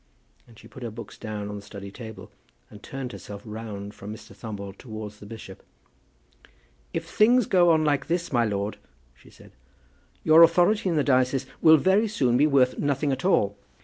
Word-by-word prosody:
And 115 -2 -18
she - - -14
put 130 - -13
her 120 - -4
books 115 +2 -10
down 105 -1 -6
on 105 0 -6
the - - -8
study 100 -1 -10
table, 110 0 -10 0.4
and 105 - -13
turned 135 0 -6
herself 100 -3 -9
round 105 -2 -7
from 100 +2 -9
Mr. 110 0 -11
Thumble 100 -3 -7
towards 110 -2 -9
the 105 - -11
bishop. 105 -3 -10 1.3
"If - - -3
things 240 +2 +4
go 175 -2 +4
on 160 -1 +3
like 145 -2 +1
this, 170 -2 -2
my 120 -1 +3
lord," 105 -1 -2 0.3
she - - -20
said, - - -17 0.7
"your 160 +1 +7
authority 180 +5 +4
in 170 - 0
the 150 - +2
diocese 130 0 +2 0.2
will 160 -1 +8
very 190 +8 +3
soon 130 - +1
be 145 +4 +4
worth 130 -3 +3
nothing 145 0 0
at 135 0 -3
all." 100 - +2
125 Hz, 185 wpm, -25 LUFS, 105-155 Hz, 1.3 s, will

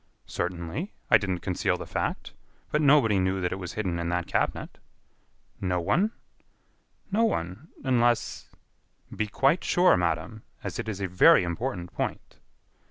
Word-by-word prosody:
"Certainly; 90 - -4 0.2
I 110 - +8
didn't 95 -3 -2
conceal 90 - 0
the - - -7
fact. - - -3 0.4
But 150 - +2
nobody 135 -9 +5
knew 95 +1 0
that 90 -1 -1
it 95 - -3
was 90 -2 -6
hidden 90 -5 -2
in 85 0 -2
that 90 0 -1
cabinet." - - -2 0.8
"No 90 -1 0
one?" 185 - +1 1.0
"No 220 +4 +2
one.... 100 - -2 0.2
unless...." 120 -3 +1 0.7
"Be 110 - -1
quite 135 - +2
sure, 180 +1 +4
madam, 90 +6 -2 0.2
as - - -5
it - - -3
is 100 -2 -5
a 95 - 0
very 90 0 +6
important 90 0 -4
point." - - -4
95 Hz, 150 wpm, -27 LUFS, 90-130 Hz, 1.0 s, I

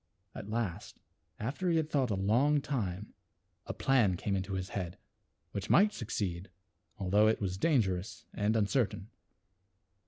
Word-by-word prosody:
At 100 - -8
last, 110 -6 -3 0.4
after 140 - -2
he 165 - +3
had 155 -1 -1
thought 135 -4 +2
a 105 - 0
long 120 +10 +3
time 105 -9 -3 0.5
a - - -3
plan 115 -9 +3
came 100 +2 -1
into 95 +1 -3
his 95 0 -3
head 90 -3 -4 0.5
which - - -5
might 205 +4 +5
succeed 95 -5 -3 0.5
although 100 +2 +3
it 110 - +2
was 95 -3 -2
dangerous 100 - 0
and 105 +2 +1
uncertain. 110 -1 0
105 Hz, 145 wpm, -32 LUFS, 95-130 Hz, 0.5 s, might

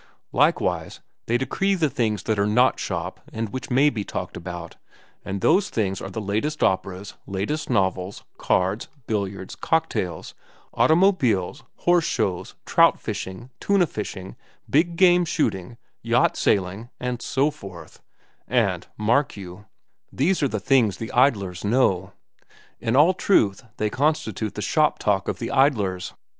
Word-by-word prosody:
Likewise - - +1 0.3
they 120 - +2
decree 195 +10 0
the 165 -4 +2
things 110 -7 -1
that 110 -2 -1
are 100 - +2
not 125 +4 +3
shop - - -4
and 110 -1 -3
which 130 +4 -6
may 135 +3 +4
be 115 -8 -1
talked - - -5
about, 85 -1 -7 0.5
and 95 0 -4
those 185 - +3
things 95 -4 -1
are 95 - -5
the 100 - -5
latest 110 +9 -2
operas, 95 +1 -1
latest 105 +11 -3
novels, 95 -4 -1 0.2
cards, 95 +5 0 0.2
billiards, 100 -3 -3
cocktails, 155 - -1 0.4
automobiles, 155 - +2
horse 175 -1 +2
shows, 90 -3 -2
trout - - +4
fishing, 115 +7 -6
tuna 200 -3 +3
fishing, 95 - -6 0.3
big 170 +4 +2
game 180 0 +5
shooting, 95 - -2 0.2
yacht - - +2
sailing, 100 +4 0
and 125 -1 -3
so 140 +5 +1
forth—and 95 - -5
mark 120 +4 +1
you, 95 +1 -10 0.5
these 170 +7 +1
are 140 - +3
the 110 -5 -3
things 110 -4 +2
the 115 - -6
idlers 100 -9 +2
know. 100 -4 +1 0.7
In 115 +2 -1
all 155 +7 +6
truth, 130 - +2
they 105 0 -1
constitute 115 - -1
the - - -4
shop - - +2
talk - - 0
of - - -2
the - - -4
idlers. 105 -10 +1
110 Hz, 140 wpm, -24 LUFS, 95-145 Hz, 0.7 s, all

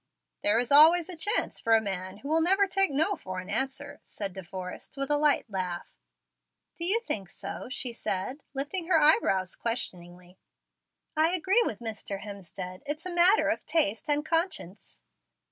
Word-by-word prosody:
"There 205 - +3
is 245 +2 0
always 320 +4 +7
a 365 - -5
chance 410 +8 0
for 225 0 +3
a - - +5
man 190 -2 -4
who 275 - -9
will 320 +2 +3
never 390 +4 +4
take 390 -1 +2
'no' 315 +8 +1
for 185 - -7
an 185 +1 -6
answer," 280 +2 -3
said 200 -3 -6
De 190 - -7
Forrest 185 +7 -8
with 275 +1 -1
a - - +4
light 295 -3 +2
laugh. 185 -4 -4 0.8
"Do 340 - -2
you 425 +6 +2
think 200 - -4
so?" - - -7
she 250 -1 -2
said, 230 +6 -3
lifting 305 +6 -2
her 340 -3 +4
eyebrows 195 - +3
questioningly. 180 -6 -5 0.8
"I 320 +3 +3
agree 380 +6 +3
with 215 - -4
Mr. 215 -3 -5
Hemstead. 190 -2 -8
It's 305 +4 -4
a 365 - -3
matter 355 +5 +5
of - - -1
taste 300 -4 0
and 295 +1 +1
conscience." 325 - -3
270 Hz, 175 wpm, -28 LUFS, -, 0.8 s, always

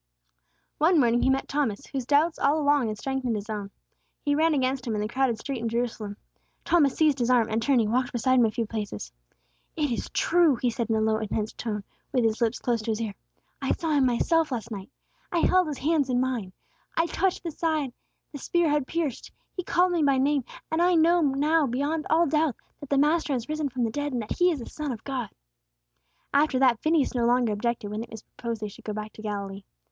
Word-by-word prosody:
One 325 +2 +4
morning 240 -2 +3
he - - +3
met 265 0 +1
Thomas, 275 -8 -1
whose 260 -3 -5
doubts 300 +4 +3
all 290 +3 +3
along 290 -4 +3
had 215 -1 -3
strengthened 265 -1 -2
his 210 +1 -5
own. 205 -2 -4 0.5
He 290 - +1
ran 315 +1 +3
against 260 -1 0
him 225 - -1
in 210 - -1
the 210 - -1
crowded 250 0 0
street 270 +2 -4
in 230 0 -2
Jerusalem. 225 -3 -3 0.5
Thomas 295 -6 +3
seized 300 -4 +3
his 240 0 +1
arm, 240 -3 +4
and, 220 +1 0
turning, 235 -4 +2
walked 250 +1 +1
beside 255 +2 +2
him 240 - +6
a - - 0
few 230 +1 -2
paces. 210 - -5 0.6
"It 295 -4 0
is 235 - -3
true!" 340 -5 +3
he 245 0 0
said, 230 0 -3
in 225 - +2
a 220 - +1
low 220 0 +2
intense 215 0 -3
tone, 210 -3 -4 0.3
with 250 - +2
his 225 +1 0
lips 230 +1 +1
close 235 -2 -1
to 220 - -5
his 220 0 0
ear. 220 -3 -3 0.5
"I - - +1
saw 325 -2 -2
Him 280 -3 +4
myself 315 +6 +2
last 230 -2 -4
night; 195 -2 -6 0.4
I 345 -2 +1
held 370 -2 +4
His 295 -3 -4
hands 295 -2 +1
in 245 -1 +2
mine! 250 -7 -1 0.5
I 330 - +4
touched 375 +2 -1
the 335 - -3
side 310 -5 -1 0.4
the 290 - -7
spear 345 +3 +1
had 295 -3 +1
pierced! 325 -7 -3 0.2
He 365 - -3
called 360 +1 +2
me 345 -2 +1
by 280 -2 +3
name; 275 -1 +1 0.3
and 320 +1 +1
I 355 0 +4
know 340 +2 +4
now 295 +2 +2
beyond 285 +6 -1
all 330 +2 +4
doubt 305 -4 +1 0.2
that 285 - -10
the 280 - +2
Master 300 +1 +2
has 240 -3 -2
risen 305 -1 -2
from 250 -1 -2
the 225 - 0
dead, 290 +2 -3
and 245 - -1
that 215 - -6
He 355 0 +5
is 330 - 0
the - - -6
Son 300 -2 -5
of 225 -3 -7
God!" 255 -6 -3 1.0
After 285 -1 +3
that, 255 -3 +4
Phineas 310 -1 +2
no 240 -2 +1
longer 240 -2 +2
objected 215 -1 -2
when 210 +1 -3
it 230 - -8
was 220 -2 -9
proposed 230 -2 -6
that - - -2
they - - -4
should 200 - -14
go 215 - -3
back 215 0 -6
to - - -11
Galilee. 200 -2 -4
260 Hz, 235 wpm, -26 LUFS, 225-300 Hz, 1.0 s, him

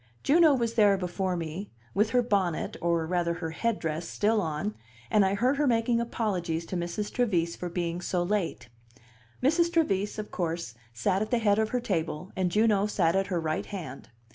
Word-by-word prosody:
Juno 315 0 +5
was 235 -3 -1
there 205 -3 +5
before 180 0 -2
me, 165 +4 -5 0.2
with 210 +2 +2
her 245 +1 +3
bonnet, 195 -8 0
or 170 -1 +1
rather 170 0 0
her 165 -2 -4
headdress, 165 -4 -2
still 215 +1 +1
on, 150 - -2 0.4
and 210 -2 +5
I 190 +1 +2
heard 250 +7 +2
her 295 0 +2
making 235 0 +2
apologies 185 -8 -2
to 185 - -5
Mrs. 175 +4 -3
Trevise 180 -9 +1
for 180 - -5
being 175 0 -2
so 175 0 0
late. 175 - -2 0.8
Mrs. 335 +5 +3
Trevise, 210 - +1
of 210 -1 -6
course, 170 -7 -3 0.2
sat 185 - 0
at 215 - -1
the 245 - +2
head 210 -2 +3
of 220 0 +1
her 250 - 0
table, 165 -6 -3
and 185 -1 +1
Juno 210 +1 +3
sat 175 -4 +1
at 195 0 +1
her 180 -3 -1
right 155 -1 -2
hand. 165 -10 -7
190 Hz, 190 wpm, -28 LUFS, 170-220 Hz, 0.8 s, Juno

